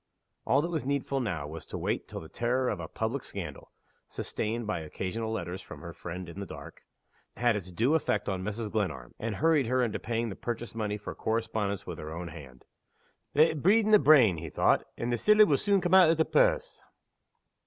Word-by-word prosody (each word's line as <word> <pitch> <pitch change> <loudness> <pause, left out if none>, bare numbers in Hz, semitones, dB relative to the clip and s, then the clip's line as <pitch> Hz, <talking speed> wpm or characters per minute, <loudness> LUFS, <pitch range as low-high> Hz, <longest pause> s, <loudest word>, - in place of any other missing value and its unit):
All 140 +3 +4
that 170 - -2
was 160 -3 -1
needful 140 0 -1
now 95 - -2
was 80 +1 -7
to - - -5
wait - - -2
till - - -7
the 80 - -10
terror 125 +6 0
of 100 - -2
a 80 - -5
public 115 - -2
scandal - - -7 0.4
(sustained 115 +2 -3
by 105 -4 -2
occasional 95 +8 -4
letters 90 -3 -4
from - - -11
her - - -8
"Friend 90 +1 -7
in 85 +3 -9
the 100 - -5
Dark") - - -10 0.6
had 120 -2 +3
its 95 -3 -5
due 115 - +1
effect 105 -10 0
on 95 -2 -2
Mrs. 105 +1 -3
Glenarm, 80 - -2
and 110 -1 -3
hurried 150 -1 +3
her 130 +1 +2
into 115 -3 -1
paying 115 0 -2
the 95 - -6
purchase 120 0 -5
money 105 -2 -2
for 105 - -7
the - - -11
correspondence 110 -3 -1
with 85 -3 -6
her 75 0 -7
own 85 0 -5
hand. 70 -6 -12 0.7
"Let 155 +3 +6
it 150 - -5
breed 210 +6 +4
in 215 - +1
the 210 - +8
brain," 135 - +6
he 80 0 -6
thought, - - +2
"and 120 +1 -2
the 120 - 0
siller 210 - +6
will 145 -8 +3
soon 200 -2 +2
come 175 +1 0
out 185 -3 +8
o' 165 - +4
the 160 0 +2
purse." - - +2
115 Hz, 220 wpm, -29 LUFS, 95-140 Hz, 0.7 s, the